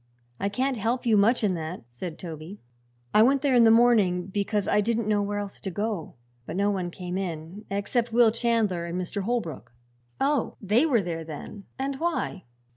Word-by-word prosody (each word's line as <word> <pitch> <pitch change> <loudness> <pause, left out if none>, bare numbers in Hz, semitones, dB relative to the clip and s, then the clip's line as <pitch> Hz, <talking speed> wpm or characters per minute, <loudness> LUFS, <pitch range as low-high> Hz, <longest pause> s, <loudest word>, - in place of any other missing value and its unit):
"I 200 - 0
can't 255 +5 -1
help 230 +4 -1
you 225 -2 +4
much 220 +4 +4
in 200 -3 +2
that," 165 -2 -5
said 155 +7 -6
Toby. 165 +3 -8 0.5
"I 210 - +6
went 270 +4 +4
there 280 -2 +3
in 240 -2 +6
the - - +7
morning, 220 -6 +4
because 200 +1 -1
I 210 - +3
didn't 230 +1 0
know 210 -1 +2
where 205 0 -2
else 205 -1 -5
to 195 - -3
go; 205 -4 -3 0.3
but - - -5
no 200 +2 +2
one 185 -3 -2
came 180 +1 -5
in 175 +2 -6
except 225 +4 -1
Will 230 -1 +5
Chandler 225 -7 0
and 170 +1 -3
Mr. 185 +3 -3
Holbrook." 205 - -3 0.5
"Oh; 275 -2 0
they 220 - +3
were 235 -9 +3
there, 165 -2 -4
then. 160 +6 -8
And 270 0 -3
why?" 330 - -2
205 Hz, 195 wpm, -26 LUFS, 180-235 Hz, 0.5 s, the